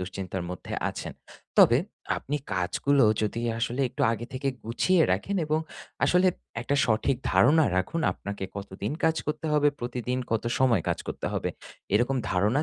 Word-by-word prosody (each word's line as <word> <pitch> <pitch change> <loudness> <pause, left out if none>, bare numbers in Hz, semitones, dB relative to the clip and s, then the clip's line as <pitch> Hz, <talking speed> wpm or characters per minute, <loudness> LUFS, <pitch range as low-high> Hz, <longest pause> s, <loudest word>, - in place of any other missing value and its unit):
দুশ্চিন্তার 95 0 -4
মধ্যে 90 - -7 0.2
আছেন। - - -6 0.5
তবে, - - +7 0.4
আপনি 145 +2 -3 0.2
কাজগুলো 100 +10 +2 0.2
যদি 105 +2 -1 0.2
আসলে 125 +2 -1
একটু 125 - -4
আগে 115 +1 -4
থেকে 135 +1 -2 0.2
গুছিয়ে 165 +10 +2
রাখেন 195 - -1
এবং 155 +1 +1 0.4
আসলে 180 +1 +4 0.3
একটা 140 +3 0
সঠিক 120 +4 +1 0.2
ধারণা 155 +5 +5
রাখুন 95 - 0
আপনাকে 100 -1 -6
কতদিন 100 +2 -5
কাজ 160 0 +3
করতে 155 +1 -2
হবে? 150 -1 +4
প্রতিদিন 125 +1 -2
কত 115 0 0
সময় 120 -9 +3
কাজ - - 0
করতে - - -4
হবে? - - -1 0.4
এরকম 120 +5 +2
ধারণা 105 +11 +2
120 Hz, 150 wpm, -27 LUFS, 100-145 Hz, 0.5 s, তবে